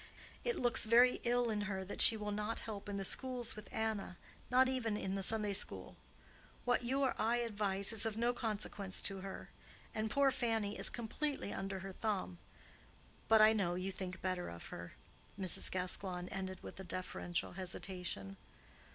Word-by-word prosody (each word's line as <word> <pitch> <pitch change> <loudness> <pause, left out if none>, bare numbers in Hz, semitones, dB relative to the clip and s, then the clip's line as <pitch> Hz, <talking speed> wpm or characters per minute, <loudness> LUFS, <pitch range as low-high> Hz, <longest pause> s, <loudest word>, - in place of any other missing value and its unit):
It 480 -1 0
looks 240 -2 +5
very 240 +3 +5
ill 240 -1 +2
in 210 -1 -1
her 190 -1 -3
that 195 - +1
she 225 - +9
will 210 -1 -4
not 210 +2 -2
help 205 -2 -7
in 200 - -3
the 195 - -1
schools 250 +1 +1
with 210 0 -11
Anna—not 220 +4 -1
even 240 -5 -1
in 190 -2 -3
the 195 - -2
Sunday 210 0 +3
school. - - -1 0.7
What 245 0 +2
you 265 +3 0
or 265 - +2
I 230 +2 +2
advise 205 -3 +1
is 220 - +6
of 220 -1 -2
no 240 +1 +1
consequence 210 -4 -2
to 195 -1 0
her: 195 0 -8 0.4
and 220 0 -2
poor 275 +1 +3
Fannie 225 -5 -1
is - - +6
completely 245 +1 -3
under 195 -1 -4
her 195 0 -6
thumb. 190 -4 -3 0.9
But 220 -1 +6
I 215 +1 +7
know 185 -5 0
you 185 +2 -3
think 185 -1 -6
better 185 -1 -2
of 85 0 -9
her," 85 0 -8 0.5
Mrs. 185 -3 +3
Gascoigne 180 0 -3
ended 185 -1 -5
with - - -9
a - - -6
deferential 175 -1 -4
hesitation. 180 - -4
205 Hz, 175 wpm, -36 LUFS, 190-230 Hz, 0.9 s, she